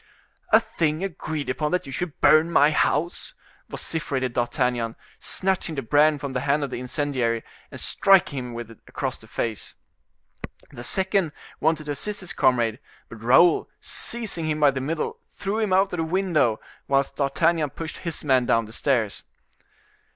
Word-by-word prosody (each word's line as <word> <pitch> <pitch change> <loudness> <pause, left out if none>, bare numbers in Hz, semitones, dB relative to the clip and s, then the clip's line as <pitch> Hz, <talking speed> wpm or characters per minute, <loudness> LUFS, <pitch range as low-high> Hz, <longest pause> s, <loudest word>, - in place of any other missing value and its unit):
"A - - +8
thing 155 +1 -1
agreed 155 -5 -4
upon 150 +3 -1
that 180 - 0
you 135 - -8
should 160 +3 -4
burn 155 +2 +6
my 150 -2 +5
house!" 165 +2 0 0.3
vociferated 130 -6 -2
D'Artagnan, 120 -1 0 0.2
snatching 185 -4 -1
the 135 - -3
brand 145 +5 +3
from 140 -2 -4
the 125 - 0
hand 140 +2 +1
of 140 - -3
the - - -4
incendiary, 125 -3 -1 0.3
and - - -9
striking 190 -8 +3
him 125 -1 -6
with 115 -1 -6
it 115 - -15
across - - -3
the - - -16
face. 115 -3 -3 1.0
The 120 -4 -9
second 190 +1 0 0.3
wanted 160 0 +1
to 150 - -3
assist 205 +9 -4
his 180 - -5
comrade, 120 -2 +2 0.3
but 115 -2 -11
Raoul, 130 +9 +5
seizing 220 -9 -3
him 155 0 -1
by 145 -2 +5
the 135 -1 -3
middle, 155 +4 -3
threw 200 +3 -3
him 215 -3 0
out 190 +1 +3
of - - -2
the 165 - 0
window, 160 - +1 0.3
whilst 135 0 +1
D'Artagnan 155 +2 +2
pushed 160 +3 -7
his 170 -2 -4
man 130 -4 +3
down 115 -1 +3
the 110 - -10
stairs. 120 -6 0
145 Hz, 170 wpm, -24 LUFS, 125-170 Hz, 1.0 s, A